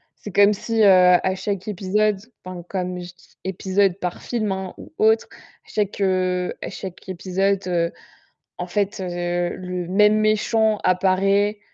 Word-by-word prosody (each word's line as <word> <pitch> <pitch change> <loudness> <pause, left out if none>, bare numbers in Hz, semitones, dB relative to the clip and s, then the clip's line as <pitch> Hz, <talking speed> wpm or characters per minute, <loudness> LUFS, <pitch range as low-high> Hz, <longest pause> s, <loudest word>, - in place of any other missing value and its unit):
C'est 205 - -9
comme 200 +2 +5
si, 225 +2 -1
heu, - - +7
à 180 0 +5
chaque 195 0 -4
épisode, 210 +1 +1 0.3
enfin, 180 -1 -8
comme 180 -1 -3
je 175 0 -9
dis 180 - -25
épisode 190 0 0
par 180 -2 -4
film, 220 -4 -2
hein, 190 -1 -4
ou - - -13
autre, 220 +1 +3 0.4
chaque, 205 -1 -2
heu, 185 -1 0
à - - -4
chaque 190 -1 -9
épisode, 185 -1 0 0.6
en 180 - -4
fait, 200 +3 -1
heu, 175 -1 -2
le 180 -1 -5
même 210 +3 +4
méchant 215 0 +2
apparaît 195 +3 +2
190 Hz, 150 wpm, -22 LUFS, 180-205 Hz, 0.6 s, heu